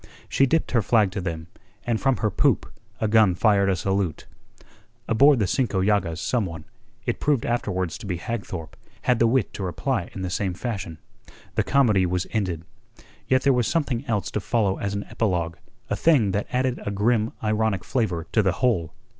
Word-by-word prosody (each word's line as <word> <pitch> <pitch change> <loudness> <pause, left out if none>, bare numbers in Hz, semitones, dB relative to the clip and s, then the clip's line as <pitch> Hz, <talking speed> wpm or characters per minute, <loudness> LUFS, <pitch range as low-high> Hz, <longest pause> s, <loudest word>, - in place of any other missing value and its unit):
She 135 - +3
dipped 160 +5 +1
her 120 - +3
flag 105 -2 +3
to 100 +1 -4
them, 80 -3 -4 0.4
and 115 -2 0
from 135 -1 +2
her 105 - 0
poop - - +2 0.3
a 110 - +1
gun 105 -4 +4
fired 100 0 +3
a 95 - +2
salute. 95 -2 -1 0.8
Aboard 140 +5 +5
the 105 - +1
Cinco 105 0 0
Llagas 95 -4 +1
some 115 -1 0
one 80 -2 -8 0.4
it - - -1
proved 145 -5 +1
afterwards 95 -7 -1
to - - -8
be 90 -3 -2
Hagthorpe 95 -6 -5 0.3
had 125 -2 +2
the 115 - +5
wit 125 -1 +1
to - - -6
reply 90 -4 -2
in 95 - -5
the 90 - -3
same 95 -1 -1
fashion. 95 -7 -4 0.6
The - - +2
comedy 110 -9 +3
was 90 +1 -1
ended. 90 -7 -2 0.6
Yet 130 0 +3
there 140 - +4
was 120 -3 +1
something 140 -7 0
else 105 -5 -1
to - - -1
follow 100 -2 0
as 100 0 -2
an 100 - -3
epilogue, 85 -6 -1 0.3
a - - -1
thing 135 -12 +3
that 100 +2 -2
added 125 0 0
a - - -3
grim 110 +2 +1
ironic 110 -3 0
flavour 95 -10 -1
to 110 - +3
the 95 -4 +1
whole. 100 -8 0
105 Hz, 190 wpm, -24 LUFS, 95-120 Hz, 0.8 s, Aboard